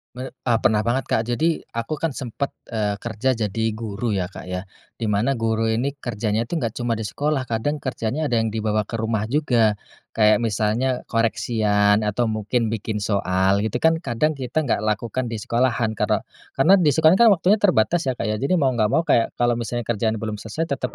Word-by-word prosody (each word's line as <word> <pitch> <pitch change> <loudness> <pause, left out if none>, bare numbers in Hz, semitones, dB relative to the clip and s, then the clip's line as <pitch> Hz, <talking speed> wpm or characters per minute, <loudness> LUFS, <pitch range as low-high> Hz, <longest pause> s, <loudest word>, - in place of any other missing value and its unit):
Me 130 +1 -6
eee, 120 -3 -1
pernah 110 0 +2
banget 130 +3 -1
Kak, 110 +1 +1
jadi 155 +7 +1 0.2
aku 115 +6 -3
kan 160 -4 -2
sempat, 135 +2 -4 0.2
eee, 105 -2 -1
kerja 120 +3 0
jadi 110 0 -2
guru 110 0 -3
ya 90 -1 -2
Kak - - -10
ya, 90 0 -4 0.3
di 110 -3 -3
mana 110 +7 +1
guru 115 -1 0
ini 115 +5 0
kerjanya 110 -1 -2
itu 175 - -4
nggak 120 -9 -1
cuma 120 -1 0
di 110 - -4
sekolah 140 +6 -1
kadang 140 +6 -1
kerjanya 130 +4 -2
ada 120 - +2
yang 115 - +1
dibawa 105 -1 0
ke - - -9
rumah 110 -1 -1
juga, 120 -6 +2 0.4
kayak 105 0 +4
misalnya 115 +3 0
koreksian 110 -2 +2
atau 110 +2 0
mungkin 110 +1 -1
bikin 110 -1 -3
soal 95 -1 +1
gitu 125 +3 -3
kan 160 0 +4
kadang 145 +1 0
kita 130 +5 -1
nggak 125 - 0
lakukan 115 +4 -1
di 115 - -4
sekolahan 120 -2 +1
karena - - +1 0.3
karena 185 +9 +5
di 170 - +1
sekolah 160 +3 +5
kan 230 -4 +7
waktunya 190 +5 +2
terbatas 175 - +2
ya 130 - +1
Kak - - -5
ya, 105 - -1
jadi 140 +8 0
mau 140 -6 +3
nggak 110 -4 +1
mau 165 - +3
kayak 115 -7 +2
kalau 120 -1 +1
misalnya 120 +1 -3
kerjaan 110 0 -1
belum 110 -1 -3
selesai 150 +10 -4
tetap 125 - -4
115 Hz, 200 wpm, -22 LUFS, 110-130 Hz, 0.4 s, kan